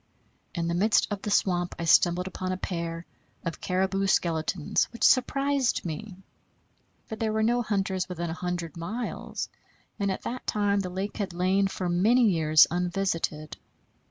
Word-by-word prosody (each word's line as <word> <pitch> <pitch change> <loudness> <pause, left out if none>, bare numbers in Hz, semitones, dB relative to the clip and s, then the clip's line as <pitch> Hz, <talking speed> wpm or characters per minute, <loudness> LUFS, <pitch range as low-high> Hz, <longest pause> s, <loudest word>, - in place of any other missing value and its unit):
In 170 -1 -1
the 170 - 0
midst 210 +6 +3
of 200 -1 -3
the 210 - -4
swamp 180 -3 +1
I 170 - -4
stumbled 175 +2 +4
upon 185 0 -4
a 185 - -2
pair 170 -2 -4 0.4
of 170 - -4
caribou 190 +1 0
skeletons, 165 -2 +1
which 235 - -8
surprised 275 -1 +2
me; 180 +5 -5 0.9
for 220 - -6
there 220 0 -1
were 220 0 +1
no 240 +2 +2
hunters 195 -4 -1
within 170 -2 -3
a - - -2
hundred 175 -2 -4
miles, 215 +9 -4 0.5
and 200 -1 0
at 190 - -5
that 250 +1 -5
time 205 -1 +1
the 185 -2 -3
lake 190 +3 -4
had 195 -4 -3
lain 190 +3 +2
for 190 -1 -4
many 220 +8 +4
years 155 -5 +5
unvisited. 175 -4 -2
185 Hz, 160 wpm, -27 LUFS, 170-205 Hz, 0.9 s, years